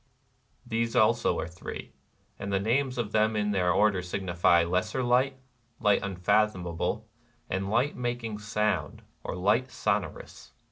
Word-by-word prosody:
These 115 0 -1
also 115 0 +3
are - - -3
three; 90 +1 -8 0.5
and 100 0 -4
the 95 - +2
names 125 +5 0
of 115 -3 -2
them 110 0 +2
in 105 0 0
their 90 -3 +2
order 100 0 +3
signify, 90 -2 +2
Lesser 90 +9 -1
Light, 130 +2 +2 0.4
Light 105 -3 +3
Unfathom 100 +1 +1
able, 90 +5 -3 0.4
and 95 +1 -1
Light 120 +7 +1
Making 120 -3 -3
Sound, 105 0 -1 0.2
or, - - -4
Light 105 +8 +2
So - - -1
norous. - - -11
105 Hz, 145 wpm, -28 LUFS, 95-115 Hz, 0.5 s, also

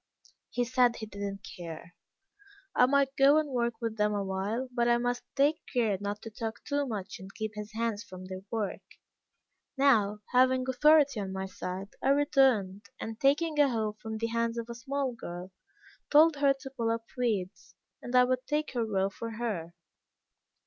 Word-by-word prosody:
He 245 - 0
said 245 -1 +3
he 220 - -6
did 205 -1 -10
not 200 0 -4
care; 170 -1 -9 0.8
I 250 - +6
might 275 0 +2
go 275 +2 +6
and 305 -2 0
work 235 -2 0
with 225 -2 -3
them 210 0 +2
awhile, 200 +5 -2
but 240 -1 +1
I 240 0 +4
must 245 0 -1
take 295 +4 +3
care 225 -5 +2
not 205 +1 -4
to 225 - -7
talk 225 0 -5
too 285 -1 -1
much 200 -5 -5
and 190 +1 -10
keep 220 -1 -3
his 210 0 -7
hands 225 -1 -2
from 185 -4 -10
their 185 0 -7
work. 220 -4 -2 1.0
Now, 210 -7 +3
having 255 0 +4
authority 285 -1 +4
on 195 -2 -4
my 190 0 -3
side, 190 +1 -6
I 270 - +1
returned, 260 -9 +3
and 225 0 -6
taking 300 +3 +2
a 285 -1 +6
hoe 220 -3 -1
from 220 -1 -5
the 230 +1 -2
hands 230 0 0
of 235 0 -4
a - - -4
small 265 +2 -2
girl, 180 -4 -8 0.6
told 310 +1 +6
her 280 -1 +4
to 270 -1 -8
pull 235 -4 -1
up 230 0 -1
weeds, 215 -7 -2 0.3
and 245 - -4
I 250 - +8
would 255 0 -1
take 300 -1 -1
her 240 -2 0
row 195 -3 0
for 230 +3 -6
her. 200 -8 -4
230 Hz, 185 wpm, -30 LUFS, 205-265 Hz, 1.0 s, I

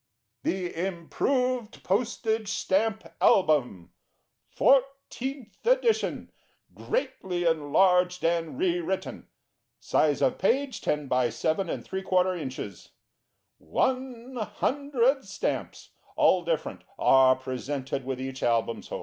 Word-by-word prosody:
THE 180 -1 -2
Improved 225 - -1
Postage 220 +1 0
Stamp 220 +3 0 0.3
Album. 130 - +1 0.6
FOURTEENTH 270 -3 0
EDITION. - - +1 0.4
GREATLY 185 - -2
ENLARGED 180 +3 +3
AND 165 +5 0
RE 355 +1 +1
WRITTEN. 340 - -4 0.5
Size 150 -2 +1
of - - +1
Page, 260 +7 +1
10 150 -1 -1
by 125 -2 +2
7 160 - -1
3/4 185 0 -1
ins. 130 - -7 0.7
One 255 - -2
Hundred 270 +3 0
Stamps, - - -4 0.2
all 180 -2 +4
different, 165 -2 -3
are 130 -1 +5
presented 130 +1 -4
with 130 0 -4
each 130 0 -5
Album 115 -1 +1
sold. - - -6
185 Hz, 100 wpm, -27 LUFS, -, 0.7 s, are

